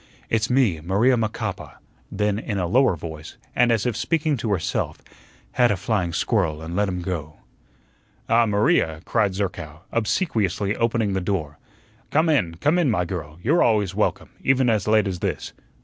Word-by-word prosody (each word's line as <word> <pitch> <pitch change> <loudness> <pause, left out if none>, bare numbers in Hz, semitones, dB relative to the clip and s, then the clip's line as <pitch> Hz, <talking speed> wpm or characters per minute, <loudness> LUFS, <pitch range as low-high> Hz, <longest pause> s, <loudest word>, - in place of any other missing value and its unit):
"It's 110 0 +1
me, 125 -10 +2
Maria 100 +10 +3
Macapa;" 110 -2 -3 0.3
then 105 0 0
in 105 -3 -3
a 90 - 0
lower 125 +3 +3
voice, 80 -1 -9 0.2
and 120 -1 +4
as 110 -3 +1
if 120 -3 0
speaking 155 +5 0
to 110 -2 -2
herself, 95 -5 -1 0.5
"had 120 -1 +3
a 105 - +1
flying 95 -2 -1
squirrel 85 -4 0
an' 85 +2 -6
let 100 0 +1
him 90 -1 -4
go." 80 -4 -5 0.9
"Ah, 115 0 +4
Maria," 100 - +2
cried 100 -3 +1
Zerkow, 90 -6 -4
obsequiously 110 - 0
opening 115 -3 0
the 95 - -1
door. 80 -6 -3 0.5
"Come 160 +2 +2
in, 90 - +1
come 150 - +2
in, 165 -6 +2
my 90 -6 +1
girl; 80 -3 -6
you're 155 +9 +3
always 105 -5 +2
welcome, 105 +2 -1
even 130 -2 +3
as 105 -2 0
late 110 -1 +4
as 90 -2 -3
this. - - -3
105 Hz, 170 wpm, -23 LUFS, 90-120 Hz, 0.9 s, and